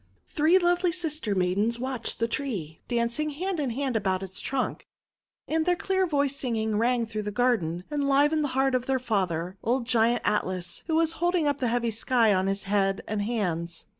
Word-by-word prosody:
Three 315 +5 +3
lovely 350 0 +2
sister 310 - -3
maidens 195 +6 +1
watched 255 -1 -4
the 230 - 0
tree, 210 - -4
dancing 240 +5 0
hand 350 +4 -3
in 280 -4 0
hand 260 +1 -2
about 195 -3 0
its 190 0 -5
trunk. 265 -2 -2 0.6
And 320 +1 +1
their 355 +2 +2
clear 380 +1 0
voiced 280 -3 0
singing 220 -4 -1
rang 240 0 +2
through 215 -1 -4
the 210 0 -4
garden, 205 -8 +1
and 285 -1 0
livened 295 +3 +3
the - - +1
heart 270 0 +3
of 255 -1 0
their 265 0 +2
father, 190 -7 -1
old 240 +2 0
Giant 235 0 +2
Atlas, 185 -4 -1
who 320 - +1
was 325 0 +3
holding 350 -2 +2
up 285 -1 0
the 250 - 0
heavy 235 0 0
sky 225 0 +2
on 190 0 +1
his 195 +1 -1
head 195 -1 +1
and 215 -1 -2
hands. 175 -7 -2
240 Hz, 195 wpm, -27 LUFS, 205-285 Hz, 0.6 s, Three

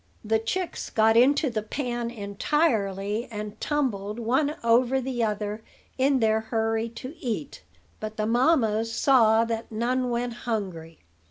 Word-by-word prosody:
The 220 +1 +2
chicks 350 +11 -3
got 220 0 +3
into 275 +3 +4
the 220 -2 -1
pan 240 +1 -3
entirely, 210 - -1
and 210 -1 -6
tumbled 220 -8 -1
one 260 +6 +1
over 240 +3 +3
the 250 -2 -2
other 210 0 -2 0.3
in 265 0 +2
their 220 0 +3
hurry 225 0 -1
to 255 +6 -7
eat; 215 - -4 0.4
but 215 0 -6
the 215 - 0
mammas 230 -3 +2
saw 230 -3 +4
that 230 0 -4
none 250 +3 0
went 240 0 -1 0.2
hungry. 175 -7 -4
225 Hz, 140 wpm, -26 LUFS, 215-255 Hz, 0.4 s, into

